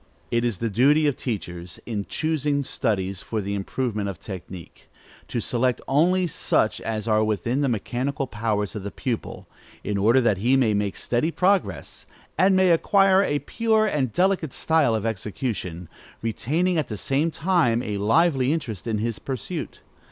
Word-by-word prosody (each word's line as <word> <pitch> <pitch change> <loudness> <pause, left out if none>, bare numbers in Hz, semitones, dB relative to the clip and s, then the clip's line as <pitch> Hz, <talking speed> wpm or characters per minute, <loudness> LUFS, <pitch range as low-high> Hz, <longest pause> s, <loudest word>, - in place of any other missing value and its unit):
It 120 0 +1
is 120 -5 0
the 115 +3 -2
duty 145 +8 +4
of 145 -3 +2
teachers, 90 -6 -5
in 105 -4 -3
choosing 150 -2 -1
studies 100 -7 -2
for 110 - -3
the 100 0 -3
improvement 105 +1 -2
of 95 - -6
technique, 90 -2 -10 0.4
to 120 - -2
select 125 +2 0
only 180 +7 +3
such 165 - 0
as 110 -1 -3
are 110 -1 +3
within 115 +5 0
the 140 - +2
mechanical 130 +5 -2
powers 105 -4 -2
of 105 - -4
the 100 - -5
pupil, 115 +3 -4 0.4
in 100 -1 -1
order 115 +6 +5
that 110 -6 +2
he 125 +6 +3
may 115 -5 +3
make 100 -1 -1
steady 120 +7 0
progress, 185 +3 0 0.3
and 190 +1 +4
may 185 -1 +4
acquire 195 +3 +4
a 145 -7 +1
pure 220 -1 +2
and 140 - 0
delicate 180 - +1
style 160 -8 +2
of 110 0 -2
execution, 105 -5 -4 0.4
retaining 160 +10 0
at 150 - -2
the 105 - -5
same 140 - 0
time 155 -8 +1
a 105 -1 -3
lively 135 +5 +3
interest 120 - -3
in 110 -2 0
his 115 +1 -2
pursuit. 130 -5 -5
120 Hz, 165 wpm, -24 LUFS, 105-155 Hz, 0.4 s, order